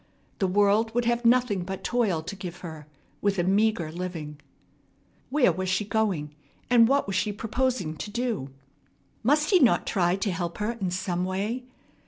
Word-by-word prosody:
The 195 Hz, -, +2 dB
world 205 Hz, +4 st, +2 dB
would 240 Hz, 0 st, +1 dB
have 235 Hz, 0 st, 0 dB
nothing 235 Hz, -5 st, +3 dB
but 190 Hz, +1 st, -6 dB
toil 210 Hz, -10 st, 0 dB
to 185 Hz, +5 st, -6 dB
give 180 Hz, -2 st, -8 dB
her, 160 Hz, -4 st, -8 dB, 0.3 s
with 200 Hz, -1 st, +1 dB
a 175 Hz, -, +2 dB
meagre 195 Hz, -3 st, +1 dB
living. 165 Hz, -4 st, -6 dB, 0.9 s
Where 285 Hz, -1 st, +4 dB
was 185 Hz, 0 st, -3 dB
she 190 Hz, +2 st, 0 dB
going, 200 Hz, -8 st, -1 dB, 0.4 s
and 235 Hz, -2 st, +7 dB
what 280 Hz, +3 st, +2 dB
was 195 Hz, -, -3 dB
she 210 Hz, +3 st, +1 dB
proposing 225 Hz, -5 st, -1 dB
to 205 Hz, -, -5 dB
do? 225 Hz, -, -2 dB, 0.7 s
Must 295 Hz, -, +2 dB
he 375 Hz, -, +6 dB
not 255 Hz, -7 st, +4 dB
try 180 Hz, -3 st, +1 dB
to 195 Hz, +1 st, -1 dB
help 175 Hz, -1 st, -3 dB
her 210 Hz, +2 st, -1 dB
in 210 Hz, -6 st, -3 dB
some 180 Hz, 0 st, -2 dB
way? 205 Hz, +7 st, -2 dB
200 Hz, 175 wpm, -26 LUFS, 180-235 Hz, 0.9 s, and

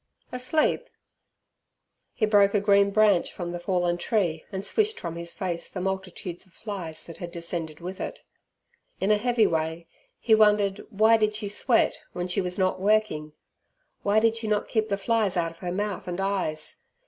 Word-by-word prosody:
Asleep?" 255 Hz, +5 st, 0 dB, 1.3 s
He 215 Hz, -, +2 dB
broke 205 Hz, -1 st, +4 dB
a -, -, +5 dB
green 200 Hz, 0 st, +4 dB
branch 205 Hz, -3 st, +3 dB
from 175 Hz, -2 st, -5 dB
the 175 Hz, -, -4 dB
fallen 175 Hz, -1 st, 0 dB
tree 175 Hz, -8 st, 0 dB
and 195 Hz, 0 st, -3 dB
swished 435 Hz, -, +1 dB
from 170 Hz, -1 st, -5 dB
his 170 Hz, 0 st, -5 dB
face 175 Hz, -3 st, -4 dB
the 185 Hz, -, -6 dB
multitudes 185 Hz, -2 st, -4 dB
of 180 Hz, -, -27 dB
flies 185 Hz, -7 st, -7 dB
that 165 Hz, -, -11 dB
had 175 Hz, -1 st, -7 dB
descended 170 Hz, -2 st, -4 dB
with 185 Hz, +2 st, -6 dB
it. -, -, -6 dB, 0.8 s
In 195 Hz, +2 st, +2 dB
a 210 Hz, -, +5 dB
heavy 235 Hz, -1 st, +3 dB
way 160 Hz, 0 st, -1 dB, 0.3 s
he 225 Hz, -, +2 dB
wondered 210 Hz, -2 st, +4 dB
why 220 Hz, +3 st, +5 dB
did 215 Hz, -1 st, +1 dB
she 210 Hz, -1 st, -2 dB
sweat, 230 Hz, +3 st, +2 dB
when 180 Hz, 0 st, -3 dB
she 180 Hz, -, 0 dB
was 180 Hz, -1 st, -3 dB
not 185 Hz, -1 st, +1 dB
working? 200 Hz, -8 st, +1 dB, 0.7 s
Why 205 Hz, +2 st, +3 dB
did 225 Hz, 0 st, +3 dB
she 225 Hz, -1 st, -2 dB
not 210 Hz, -1 st, 0 dB
keep 220 Hz, -1 st, 0 dB
the 200 Hz, -, 0 dB
flies 205 Hz, -2 st, +1 dB
out 165 Hz, -1 st, 0 dB
of 165 Hz, -, -18 dB
her 180 Hz, -1 st, -4 dB
mouth 200 Hz, 0 st, -3 dB
and 175 Hz, +1 st, -3 dB
eyes? 190 Hz, -6 st, -2 dB
195 Hz, 185 wpm, -26 LUFS, 175-215 Hz, 1.3 s, a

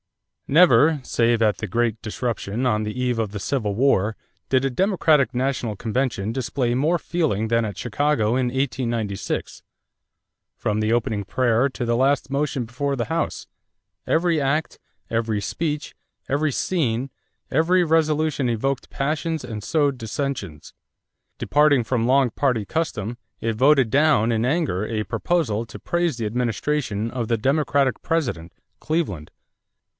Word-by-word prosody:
= -, -, -57 dB
Never, 150 Hz, -1 st, +5 dB
save 115 Hz, -2 st, +1 dB
at 105 Hz, -2 st, +2 dB
the 105 Hz, -, -3 dB
great 115 Hz, +2 st, 0 dB
disruption 115 Hz, 0 st, -3 dB
on 110 Hz, -3 st, +1 dB
the 105 Hz, +3 st, -4 dB
eve 125 Hz, -2 st, 0 dB
of 110 Hz, -3 st, -1 dB
the 105 Hz, -, -5 dB
Civil 105 Hz, -1 st, -1 dB
War, 110 Hz, -4 st, +2 dB, 0.3 s
did 130 Hz, 0 st, +2 dB
a -, -, +2 dB
Democratic 155 Hz, -, +2 dB
national 125 Hz, -3 st, -1 dB
convention 115 Hz, -2 st, -1 dB
display 125 Hz, -1 st, -1 dB
more 150 Hz, +8 st, +2 dB
feeling 150 Hz, -, -1 dB
than 115 Hz, 0 st, +2 dB
at 105 Hz, -4 st, -4 dB
Chicago 135 Hz, -1 st, 0 dB
in 125 Hz, +2 st, +1 dB
1896. 120 Hz, -6 st, -2 dB, 1.0 s
From 105 Hz, 0 st, -1 dB
the 110 Hz, +1 st, +1 dB
opening 110 Hz, -3 st, 0 dB
prayer 120 Hz, +4 st, +1 dB
to 130 Hz, -2 st, -4 dB
the 120 Hz, 0 st, +1 dB
last 135 Hz, +2 st, +2 dB
motion 140 Hz, -3 st, -1 dB
before 140 Hz, +4 st, -2 dB
the 120 Hz, -, -1 dB
house, 165 Hz, +1 st, -2 dB, 0.6 s
every 165 Hz, -2 st, +2 dB
act, 140 Hz, +3 st, -1 dB, 0.3 s
every 115 Hz, -2 st, 0 dB
speech, 150 Hz, -, -3 dB, 0.3 s
every 145 Hz, +2 st, +1 dB
scene, 135 Hz, -5 st, -1 dB, 0.4 s
every 175 Hz, +5 st, +3 dB
resolution 155 Hz, -4 st, +1 dB
evoked 130 Hz, +4 st, -1 dB
passions 155 Hz, +1 st, -2 dB
and 110 Hz, -4 st, -6 dB
sowed 145 Hz, 0 st, +1 dB
dissensions. 110 Hz, -, -5 dB, 0.6 s
Departing 145 Hz, -4 st, +3 dB
from 115 Hz, -1 st, 0 dB
long 130 Hz, -1 st, +3 dB
party 125 Hz, -5 st, 0 dB
custom, 120 Hz, -7 st, -3 dB, 0.2 s
it 115 Hz, 0 st, -1 dB
voted 135 Hz, +1 st, +4 dB
down 140 Hz, -4 st, +3 dB
in 110 Hz, 0 st, 0 dB
anger 135 Hz, -, 0 dB
a 110 Hz, -1 st, -2 dB
proposal 115 Hz, -, 0 dB
to -, -, -10 dB
praise 175 Hz, -6 st, -1 dB
the 115 Hz, -, -3 dB
administration 115 Hz, 0 st, -1 dB
of 120 Hz, -3 st, -3 dB
the 115 Hz, -, +2 dB
Democratic 140 Hz, +1 st, +1 dB
President, 120 Hz, -, -2 dB, 0.3 s
Cleveland. 140 Hz, -, -2 dB
125 Hz, 145 wpm, -23 LUFS, 110-145 Hz, 1.0 s, Never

